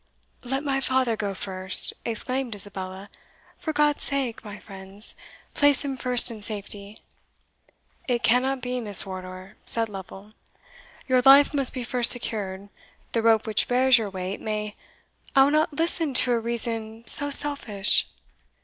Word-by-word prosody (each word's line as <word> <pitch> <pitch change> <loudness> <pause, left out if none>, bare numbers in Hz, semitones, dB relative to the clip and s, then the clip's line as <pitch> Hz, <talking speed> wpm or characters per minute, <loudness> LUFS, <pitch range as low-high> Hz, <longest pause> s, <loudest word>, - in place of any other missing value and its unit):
"Let 270 +3 -4
my 270 -2 -2
father 260 -3 0
go 200 -2 -5
first," 185 -1 +3
exclaimed 250 +1 -4
Isabella; 195 -1 -8 0.5
"for 315 - -4
God's 295 -1 0
sake, 265 -6 -2
my 205 -2 -10
friends, 195 +1 -5 0.4
place 290 0 +2
him 275 -1 -4
first 250 -2 +4
in 220 -2 -10
safety!" 205 -1 -4 1.1
"It 245 -2 -2
cannot 255 +3 +1
be, 250 0 -4
Miss 205 -5 +4
Wardour," 185 +1 -10
said 225 -1 +3
Lovel; 195 +1 -11 0.8
"your 255 -1 +2
life 275 +3 +5
must 275 -3 0
be 255 - -6
first 245 -1 +3
secured 205 -5 +3 0.4
the 230 - -1
rope 225 -1 +2
which 215 -2 0
bears 255 0 +3
your 215 -2 -5
weight 190 0 -7
may" 210 -1 -5 0.6
"I 270 - +6
will 280 - +1
not 310 +1 0
listen 325 -2 -1
to 250 - +5
a 235 - +1
reason 225 -1 -6
so 285 +4 +4
selfish!" 275 -9 +1
230 Hz, 150 wpm, -23 LUFS, 205-265 Hz, 1.1 s, I